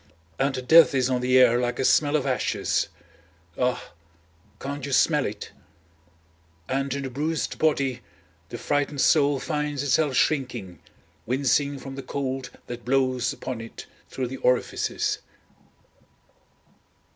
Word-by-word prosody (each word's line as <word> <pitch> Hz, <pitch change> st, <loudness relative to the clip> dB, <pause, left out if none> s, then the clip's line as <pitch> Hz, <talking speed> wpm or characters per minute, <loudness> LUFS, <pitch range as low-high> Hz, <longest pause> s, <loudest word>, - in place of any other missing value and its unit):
And 135 Hz, -2 st, -1 dB
death 165 Hz, -2 st, +7 dB
is 130 Hz, 0 st, +1 dB
on 125 Hz, -1 st, 0 dB
the 125 Hz, +1 st, +3 dB
air 120 Hz, -2 st, +6 dB
like 120 Hz, 0 st, -1 dB
a 130 Hz, -, 0 dB
smell 145 Hz, +2 st, +3 dB
of 145 Hz, -, +1 dB
ashes! 130 Hz, -2 st, 0 dB, 0.7 s
Ah! 125 Hz, 0 st, -1 dB, 0.7 s
can't 140 Hz, 0 st, -5 dB
you 140 Hz, 0 st, -3 dB
smell 150 Hz, +2 st, +3 dB
it? 105 Hz, 0 st, -7 dB, 1.2 s
And 135 Hz, +1 st, -1 dB
in 140 Hz, -, -4 dB
the 135 Hz, -, -5 dB
bruised 150 Hz, +5 st, -2 dB
body, 135 Hz, -5 st, +1 dB, 0.5 s
the -, -, -6 dB
frightened 145 Hz, -1 st, -1 dB
soul 145 Hz, -3 st, +4 dB
finds 150 Hz, -1 st, -2 dB
itself 145 Hz, 0 st, +2 dB
shrinking, 125 Hz, -, -1 dB, 0.5 s
wincing 140 Hz, +3 st, +1 dB
from 135 Hz, 0 st, -8 dB
the 135 Hz, -, -6 dB
cold 135 Hz, -2 st, -4 dB, 0.2 s
that 120 Hz, -1 st, -7 dB
blows 130 Hz, -1 st, +1 dB
upon 125 Hz, -3 st, -6 dB
it 115 Hz, -, -10 dB, 0.2 s
through 130 Hz, -, -3 dB
the 135 Hz, -, -6 dB
orifices. 125 Hz, -1 st, 0 dB
135 Hz, 135 wpm, -25 LUFS, 125-145 Hz, 1.2 s, death